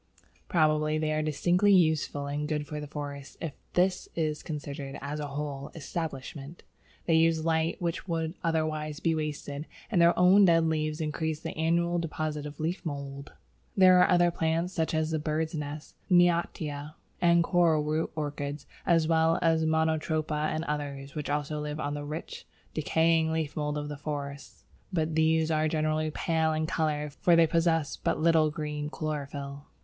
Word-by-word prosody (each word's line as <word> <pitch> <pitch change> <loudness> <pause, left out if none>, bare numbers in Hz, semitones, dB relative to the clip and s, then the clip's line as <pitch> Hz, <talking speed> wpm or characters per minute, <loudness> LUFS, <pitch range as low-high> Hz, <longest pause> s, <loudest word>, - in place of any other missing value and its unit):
Probably 155 -2 +2
they 155 0 0
are 155 0 +1
distinctly 175 +6 +2
useful 155 -4 +2
and 145 +1 -3
good 150 -1 -2
for 150 +1 -5
the 150 - -6
forest 140 -2 -7
if 165 -4 -4 0.2
this 180 +1 +1
is 155 -2 -1
considered 145 -2 -6
as 145 +2 -5
a 145 - -3
whole 140 0 -5
establishment. 150 -1 -6 0.4
They 165 - +2
use 160 0 +3
light 160 0 +1
which 170 +1 -3
would 165 -2 -1
otherwise 155 -2 -1
be 165 -2 +1
wasted, 150 -1 -4 0.2
and 180 -6 +3
their 170 0 +5
own 185 +3 +7
dead 165 -2 +4
leaves 155 0 -1
increase 155 0 -2
the - - -5
annual 170 +2 +1
deposit 155 -2 -3
of 145 -1 -10
leaf 165 +4 -2
mould. 140 -3 -6 0.4
There 185 -1 +7
are - - +5
other 175 -1 +4
plants, 165 +2 -1
such 160 -2 -1
as 155 0 0
the 160 - 0
Bird's 155 +1 -1
nest 150 -1 -5 0.2
(Neottia) 170 -4 +1 0.3
and 170 -1 +5
Coralroot 160 -3 +2
Orchids, 145 -1 -4 0.2
as 165 -2 +4
well 160 0 +3
as 160 -1 +3
Monotropa 160 -1 0
and 155 +1 -2
others, 140 -3 -4
which 150 -2 -4
also 150 +1 -1
live 150 0 -4
on 145 -1 -2
the 145 0 -4
rich, 150 +2 -7 0.3
decaying 160 +1 +2
leaf 160 -2 -2
mould 150 -1 -2
of 145 -1 -5
forests, 140 -2 -6 0.3
but 160 -3 0
these 160 0 +2
are 155 0 +2
generally 155 0 0
pale 160 0 0
in 155 0 0
colour, 150 -3 -1
for 170 +4 +3
they 165 0 +6
possess 165 -2 +1
but - - 0
little 160 -1 +4
green 150 -1 -4
chlorophyll. 145 -2 -5
155 Hz, 165 wpm, -29 LUFS, 150-165 Hz, 0.4 s, own